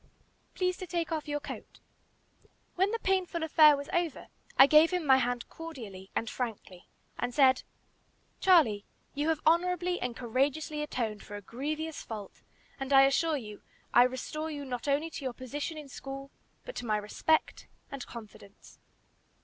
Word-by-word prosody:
"Please 365 -1 0
to 370 - -7
take 340 -1 -2
off 315 -1 -2
your 295 0 -1
coat." 295 - -9 0.9
When 380 +2 +2
the 455 - -1
painful 375 -5 0
affair 305 -2 +6
was 285 0 -6
over, 345 -5 -1 0.3
I 270 - +10
gave 305 +3 +6
him 360 -3 -1
my 265 -2 +6
hand 245 -1 -1
cordially 225 -13 -9
and 230 - -1
frankly, 215 -7 -5 0.3
and 245 0 -2
said, 265 -2 +5 0.8
"Charlie, 295 - +5 0.3
you 290 +2 0
have 320 -2 0
honorably 355 +2 +2
and 245 -2 -3
courageously 275 +5 -1
atoned 230 -8 -3
for 205 - -9
a 205 - -6
grievous 305 +8 -4
fault, 210 -3 -8 0.4
and 270 0 -4
I 270 -1 +8
assure 300 +3 +2
you, 210 -5 -9 0.3
I - - +8
restore 260 +5 -1
you 290 -2 -5
not 250 0 -5
only 295 +4 +1
to 290 - -7
your 260 -2 -2
position 290 +6 -5
in 300 -2 -8
school, 275 0 -8 0.3
but - - -8
to - - -4
my 215 -1 +2
respect 210 +9 0 0.2
and 275 -2 -5
confidence." 210 -3 -12
280 Hz, 165 wpm, -30 LUFS, 245-320 Hz, 0.9 s, I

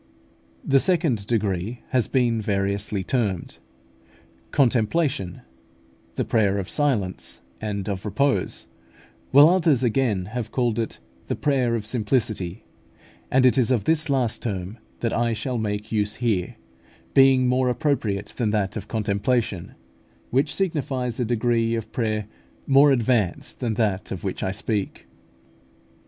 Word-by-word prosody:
The 135 0 +4
second 150 - +1
degree 105 0 -1
has 125 -3 +1
been 120 -4 +1
variously 100 0 -1
termed 100 -7 -2 0.9
Contemplation, 130 - +1 0.7
The - - -1
Prayer 100 -3 +2
of 95 -2 -3
Silence, 115 - -1 0.2
and 100 -2 -3
of 95 -3 -3
repose; 140 +6 0 0.6
while 145 +3 +8
others 165 -7 +3
again 115 -6 +1
have 120 -3 -3
called 120 -3 0
it 115 - -3 0.3
the - - -1
Prayer 130 -5 +1
of 110 -2 -3
Simplicity; 105 -5 -1 0.6
and 130 0 +4
it 130 +1 +5
is 125 - +2
of 120 -6 +2
this 160 +4 +1
last 125 -4 +1
term 100 0 -4 0.2
that 115 - 0
I 115 0 +1
shall 120 +2 -3
make 105 -1 -3
use 105 -1 0
here, 110 -7 -1 0.6
being 135 -1 +5
more 125 0 +2
appropriate 115 -7 -1
than 115 -4 +1
that 105 -2 0
of - - -5
Contemplation, 105 -2 -1 0.6
which 135 +4 +1
signifies 135 -10 -2
a 125 - +1
degree 115 0 +1
of 115 -1 -5
prayer 110 -3 -1 0.4
more 140 +1 +6
advanced 115 -7 0
than 115 -4 -1
that 105 -3 -1
of 95 - -5
which 95 - -3
I - - -1
speak. 105 +1 -3
115 Hz, 135 wpm, -24 LUFS, 105-130 Hz, 0.9 s, while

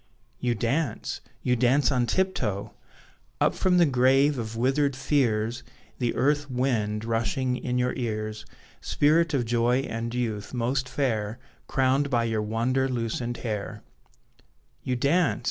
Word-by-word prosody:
You 120 -1 0
dance! 135 +9 -2 0.2
You 125 - +2
dance 130 +5 +3
on 125 -3 +1
tiptoe! 110 - -1 0.7
Up - - +3
from 185 -1 +2
the 175 - +6
grave 135 +1 +3
of 115 0 -5
withered 135 +3 +1
fears, 120 -4 0 0.4
The 120 -2 0
earth 145 +3 +1
wind, 115 -5 -1
rushing 125 +3 0
in 125 0 -2
your 125 0 +1
ears, 110 -3 -3 0.4
Spirit 160 +2 +2
of 125 -3 +1
joy 120 +2 +2
and 115 -3 -4
youth, 115 -2 -3
most 130 +2 -1
fair, 110 -5 -1 0.3
Crowned 135 +2 +2
by 120 -3 +2
your 110 -2 0
wonder 120 +5 0
loosened 120 0 -2
hair; 105 -3 -4 1.0
You 130 - -1
dance! 160 +8 +2
125 Hz, 135 wpm, -26 LUFS, 115-135 Hz, 1.0 s, the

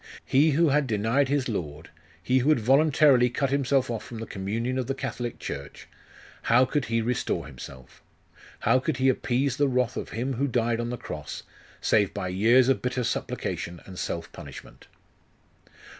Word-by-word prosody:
He 145 +3 +4
who 165 -2 +4
had 145 0 +2
denied 115 +5 +1
his 140 -2 +1
Lord, 80 - -5 0.3
he 130 +4 +3
who 130 +4 +1
had 155 - +4
voluntarily 135 0 +4
cut 135 +2 -1
himself 135 -2 +1
off 115 - -4
from 120 - -9
the 115 - -5
communion 115 +7 -3
of 125 - -3
the 135 - -1
Catholic 120 -3 -4
Church 70 0 -7 0.5
how 125 +3 +4
could 140 0 -1
he 115 0 0
restore 125 +2 -1
himself? 65 0 -12 0.6
How 120 +3 +4
could 130 - -2
he 135 0 +3
appease 130 +1 0
the 145 -1 +3
wrath 125 -1 0
of - - -4
Him 125 +4 -3
who 135 +3 0
died 120 -2 0
on 120 0 -2
the 125 - -4
cross, - - -7 0.4
save 100 -3 +2
by 95 -2 -3
years 115 +7 +4
of 135 - +2
bitter 125 0 -1
supplication 85 -5 -3
and 95 -1 -9
self 85 - -4
punishment?.... - - -11
125 Hz, 175 wpm, -26 LUFS, 110-135 Hz, 0.6 s, He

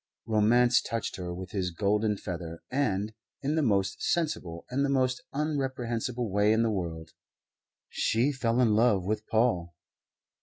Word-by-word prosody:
Romance 120 +3 +4
touched 115 -1 -3
her 90 -2 -5
with 90 +1 -7
his 95 -3 -1
golden 105 +3 +1
feather 85 -3 -6
and, 110 -6 0 0.3
in 145 +2 0
the 160 - +2
most 100 -7 +1
sensible 95 - -1
and 135 +2 +1
the 140 - +1
most 130 -2 +1
unreprehensible 130 -5 -2
way 105 +1 +3
in 110 +1 +3
the 115 - +1
world, 80 -5 -4 0.8
she 120 +6 +1
fell 120 -3 0
in 115 -4 +4
love 105 -4 +3
with 105 +2 -2
Paul. 90 -7 +1
110 Hz, 150 wpm, -29 LUFS, 95-125 Hz, 0.8 s, Romance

